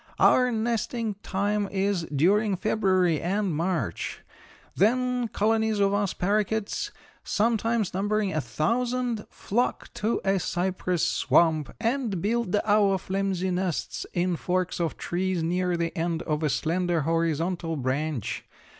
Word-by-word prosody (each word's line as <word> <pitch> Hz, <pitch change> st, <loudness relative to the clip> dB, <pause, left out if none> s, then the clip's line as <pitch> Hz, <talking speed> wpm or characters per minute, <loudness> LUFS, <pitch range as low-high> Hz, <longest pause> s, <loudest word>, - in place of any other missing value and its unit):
"Our 250 Hz, -1 st, +5 dB
nesting 230 Hz, 0 st, -1 dB
time 205 Hz, +1 st, 0 dB
is 195 Hz, -3 st, 0 dB
during 190 Hz, +8 st, +2 dB
February 185 Hz, -4 st, +2 dB
and 190 Hz, -1 st, 0 dB
March. 165 Hz, -, -2 dB, 0.5 s
Then 250 Hz, +4 st, +2 dB
colonies 220 Hz, 0 st, +1 dB
of 200 Hz, 0 st, +3 dB
us 205 Hz, -2 st, +1 dB
paroquets, 210 Hz, -, 0 dB, 0.3 s
sometimes 225 Hz, -1 st, +1 dB
numbering 205 Hz, 0 st, 0 dB
a 155 Hz, -, 0 dB
thousand, 235 Hz, -, -1 dB
flock 240 Hz, +5 st, -2 dB
to 220 Hz, +3 st, 0 dB
a 195 Hz, 0 st, +2 dB
cypress 180 Hz, -1 st, 0 dB
swamp 160 Hz, -3 st, +2 dB
and 230 Hz, -4 st, 0 dB
build 215 Hz, +1 st, 0 dB
our 205 Hz, -2 st, +4 dB
flimsy 190 Hz, 0 st, -1 dB
nests 180 Hz, -2 st, -2 dB
in 175 Hz, -1 st, +1 dB
forks 180 Hz, +1 st, -1 dB
of 170 Hz, -2 st, -1 dB
trees, 180 Hz, -1 st, -1 dB
near 180 Hz, +1 st, 0 dB
the 165 Hz, 0 st, -2 dB
end 165 Hz, 0 st, -1 dB
of 150 Hz, -1 st, -1 dB
a 155 Hz, -, +1 dB
slender, 170 Hz, +3 st, 0 dB
horizontal 165 Hz, +2 st, 0 dB
branch. 135 Hz, -1 st, -2 dB
190 Hz, 125 wpm, -26 LUFS, 170-215 Hz, 0.5 s, Our